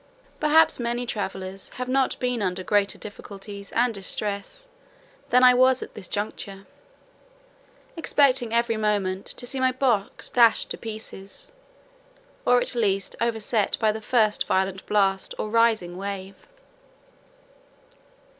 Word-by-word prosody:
Perhaps 305 0 +4
many 240 +1 -2
travellers 190 -3 -5
have 250 0 -4
not 265 +1 +1
been 250 -2 -1
under 185 -1 -2
greater 200 +1 +1
difficulties 200 -1 -9
and 240 0 +2
distress 200 - -5 0.6
than 250 +1 +5
I 250 0 +8
was 255 +1 +4
at - - -11
this 190 -4 -7
juncture, 200 -1 -5 1.3
expecting 270 -7 +2
every 235 -1 +1
moment 200 -3 -1
to 245 - -8
see 265 +2 -4
my 260 0 +3
box 250 -6 -1
dashed 235 -2 +4
to - - -3
pieces, 215 - -8 1.0
or 245 0 +6
at - - 0
least 200 -5 0
overset 225 -2 0
by 220 -2 +3
the 220 +1 -6
first 215 -2 +1
violent 190 0 0
blast, 195 -2 +1
or 215 - -4
rising 225 -6 +2
wave. 195 0 -7
215 Hz, 125 wpm, -25 LUFS, 195-245 Hz, 1.3 s, I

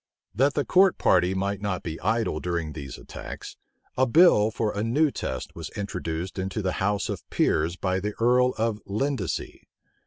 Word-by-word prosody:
That 135 +7 +2
the 145 - 0
court 190 0 +4
party 90 +1 +3
might 100 +1 -2
not 100 -3 -2
be 80 -1 -5
idle 110 -6 0
during 85 -3 -2
these 70 -4 -7
attacks, - - -9 0.4
a 130 +1 +3
bill 135 - +6
for 110 -1 -2
a 105 - -1
new 140 +7 +2
test - - -5
was - - -6
introduced 90 -2 -4
into 95 +3 -3
the 95 - 0
house 105 +1 +1
of - - -6
peers 80 +3 +1
by 95 0 -1
the 105 +2 -4
earl 125 +2 +3
of 110 -2 -1
Lindesey. 110 - -3
105 Hz, 175 wpm, -26 LUFS, 95-120 Hz, 0.4 s, bill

